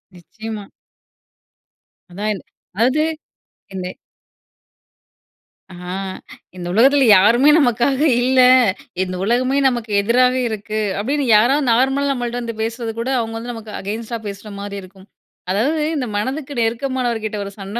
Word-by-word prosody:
நிச்சயமா. 210 Hz, +5 st, -8 dB, 1.5 s
அதான், 205 Hz, +2 st, -3 dB, 0.4 s
அதாவது 260 Hz, +8 st, +2 dB, 0.7 s
என்ன 185 Hz, -1 st, -5 dB, 1.8 s
ஆ -, -, -10 dB, 0.8 s
இந்த 175 Hz, -1 st, -6 dB
உலகத்துல 270 Hz, +5 st, +5 dB
யாருமே 235 Hz, +9 st, +5 dB
நமக்காக 250 Hz, +1 st, +2 dB, 0.2 s
இல்ல, 260 Hz, +1 st, +2 dB, 0.6 s
இந்த 185 Hz, 0 st, -5 dB
உலகமே 255 Hz, +5 st, +1 dB
நமக்கு 240 Hz, -4 st, -2 dB
எதிராவே 250 Hz, +4 st, +3 dB
இருக்கு, 215 Hz, 0 st, -4 dB, 0.2 s
அப்டின்னு 280 Hz, +6 st, -1 dB
யாராவது 270 Hz, +6 st, +3 dB
நார்மலா 270 Hz, +4 st, +2 dB
நம்மள்ட்ட 245 Hz, -2 st, -3 dB
வந்து 230 Hz, -1 st, -5 dB
பேசுறது 230 Hz, 0 st, -3 dB
கூட 245 Hz, +3 st, -2 dB
அவங்க 225 Hz, -1 st, -3 dB
வந்து 240 Hz, +2 st, -5 dB
நமக்கு 225 Hz, -2 st, -9 dB
அகைன்ஸ்டா 220 Hz, +4 st, -4 dB
பேசுற 200 Hz, +1 st, -8 dB
மாரி 200 Hz, 0 st, -6 dB
இருக்கும். 190 Hz, +1 st, -16 dB, 0.4 s
அதாவது 270 Hz, +12 st, +1 dB
இந்த 275 Hz, -4 st, -1 dB
மனதுக்கு 265 Hz, +6 st, -3 dB
நெருக்கமானவர்கிட்ட 230 Hz, -2 st, -1 dB
ஒரு 200 Hz, -, -7 dB
சண்ட 200 Hz, +3 st, -5 dB
230 Hz, 120 wpm, -19 LUFS, 210-260 Hz, 1.8 s, உலகத்துல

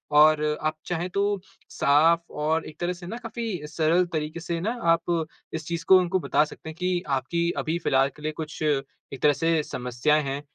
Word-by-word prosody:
और 155 Hz, 0 st, +6 dB, 0.2 s
आप 155 Hz, 0 st, 0 dB
चाहें 175 Hz, +1 st, -2 dB
तो 195 Hz, -, -1 dB, 0.5 s
साफ़ 160 Hz, +4 st, +4 dB
और 155 Hz, +2 st, 0 dB
एक 155 Hz, -, -11 dB
तरह 175 Hz, +1 st, -1 dB
से 175 Hz, 0 st, -10 dB
ना 225 Hz, -, -5 dB
काफ़ी 235 Hz, -1 st, -5 dB, 0.2 s
सरल 160 Hz, +3 st, +2 dB
तरीके 155 Hz, +1 st, -2 dB
से 170 Hz, 0 st, -3 dB
ना 215 Hz, +6 st, 0 dB, 0.2 s
आप 165 Hz, -1 st, +1 dB, 0.3 s
इस 160 Hz, -1 st, -4 dB
चीज़ 170 Hz, -1 st, -3 dB
को 190 Hz, -, +8 dB
उनको 185 Hz, +1 st, +1 dB
बता 160 Hz, -, +2 dB
सकते 160 Hz, +1 st, -10 dB
हैं 160 Hz, -, -8 dB
कि 180 Hz, -1 st, 0 dB
आपकी 170 Hz, +6 st, 0 dB
अभी 160 Hz, +2 st, -1 dB
फ़िलहाल 135 Hz, -4 st, +2 dB
के 150 Hz, -, -15 dB
लिए 155 Hz, -, -1 dB
कुछ 155 Hz, +1 st, -7 dB
एक 135 Hz, -2 st, -3 dB
तरह 150 Hz, -, +5 dB
से 165 Hz, +3 st, +1 dB
समस्याएँ 125 Hz, +4 st, 0 dB
हैं 140 Hz, 0 st, -3 dB
160 Hz, 200 wpm, -26 LUFS, 150-175 Hz, 0.5 s, को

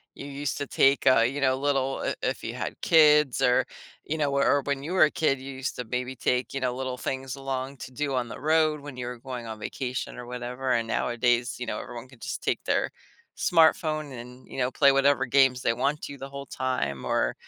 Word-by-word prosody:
You -, -, -8 dB
used 140 Hz, 0 st, -3 dB
to 145 Hz, -, -2 dB
take, 135 Hz, +1 st, +3 dB
uh, 130 Hz, -3 st, +6 dB
you 135 Hz, +5 st, 0 dB
know, 130 Hz, -1 st, +3 dB
little 135 Hz, -1 st, 0 dB
i -, -, -1 dB
if -, -, -1 dB
you -, -, -4 dB
had -, -, -5 dB
kids 150 Hz, -4 st, +5 dB
or 125 Hz, 0 st, +4 dB, 0.4 s
you 160 Hz, -, -2 dB
know, 145 Hz, -2 st, +1 dB
or 140 Hz, +1 st, +3 dB
when 140 Hz, -1 st, -2 dB
you 165 Hz, +5 st, -4 dB
were 185 Hz, -, +6 dB
a 155 Hz, -, +4 dB
kid, 140 Hz, -4 st, +1 dB
you 135 Hz, +1 st, -7 dB
used 130 Hz, +1 st, -4 dB
to 125 Hz, -, -5 dB
maybe 125 Hz, +3 st, -3 dB
take, 125 Hz, -1 st, 0 dB
you 135 Hz, -, -3 dB
know, 125 Hz, -1 st, 0 dB
little 130 Hz, 0 st, -4 dB
things 130 Hz, +1 st, -4 dB
along 135 Hz, 0 st, -4 dB
to 130 Hz, -, -9 dB
do 140 Hz, +2 st, -2 dB
on 125 Hz, -2 st, -1 dB
the -, -, -8 dB
road 155 Hz, 0 st, +2 dB
when 145 Hz, -2 st, -9 dB
you 125 Hz, -, -4 dB
were 125 Hz, 0 st, -5 dB
going 125 Hz, -1 st, -6 dB
on 110 Hz, -1 st, -7 dB
vacation 125 Hz, +3 st, -4 dB
or 125 Hz, -, -7 dB
whatever, 125 Hz, +1 st, -4 dB
and 115 Hz, -2 st, +1 dB
nowadays, 120 Hz, +2 st, +1 dB
you 125 Hz, -, -3 dB
know, -, -, -3 dB
everyone 120 Hz, 0 st, -8 dB
can 130 Hz, -2 st, -18 dB
just -, -, -5 dB
take -, -, -1 dB
their -, -, +1 dB, 0.5 s
smartphone 155 Hz, -3 st, +3 dB
and, 125 Hz, +1 st, -12 dB
you -, -, -9 dB
know, 125 Hz, -1 st, 0 dB
play 140 Hz, +1 st, +5 dB
whatever 135 Hz, 0 st, +3 dB
games 130 Hz, -1 st, +4 dB
they 115 Hz, -, +2 dB
want 140 Hz, +5 st, -1 dB
to 140 Hz, -, -6 dB
the 135 Hz, 0 st, -8 dB
whole 140 Hz, 0 st, -7 dB
time 70 Hz, -, -2 dB
or -, -, +1 dB
130 Hz, 235 wpm, -27 LUFS, 125-140 Hz, 0.5 s, uh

